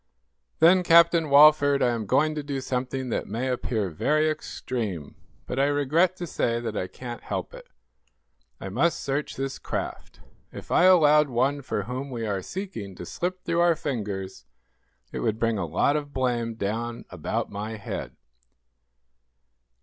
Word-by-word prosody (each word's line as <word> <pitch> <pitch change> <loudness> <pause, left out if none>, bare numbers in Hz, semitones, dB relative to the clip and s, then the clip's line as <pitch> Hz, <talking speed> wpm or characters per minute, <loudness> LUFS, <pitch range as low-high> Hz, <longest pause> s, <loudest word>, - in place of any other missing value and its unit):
"Then, 175 +3 +6
Captain 170 -2 +5
Walford, 145 -1 +6
I 125 - +3
am 115 -3 -3
going 155 +8 +2
to 150 - -3
do 140 -1 -4
something 130 0 -3
that - - -2
may 125 +3 -2
appear 110 -6 -2
very 155 - +1
extreme, 110 - -5 0.3
but 130 - -3
I 135 - +4
regret 145 +6 +2
to 180 - -5
say 120 -7 -1
that 115 -2 -4
I 90 - -2
can't 120 +3 -8
help - - -5
it. - - -12 0.9
I 95 - -6
must 140 - +1
search 140 +2 -3
this 135 0 -4
craft. - - -5 0.3
If - - -10
I 180 - +5
allowed 150 -5 +6
one 135 +4 0
for - - -3
whom 130 +3 -5
we 120 -3 -4
are 100 -3 -2
seeking 145 - -6
to 90 - -8
slip 180 - -4
through 170 - 0
our 170 -1 +4
fingers 105 - -5 0.7
it - - -4
would 110 -1 0
bring 115 -2 0
a 85 - -2
lot 90 - +1
of 145 -1 -4
blame 120 -3 -1
down 115 +3 -3
about 90 -4 -3
my 105 +2 -5
head." 100 - -6
130 Hz, 165 wpm, -26 LUFS, 115-150 Hz, 0.9 s, Then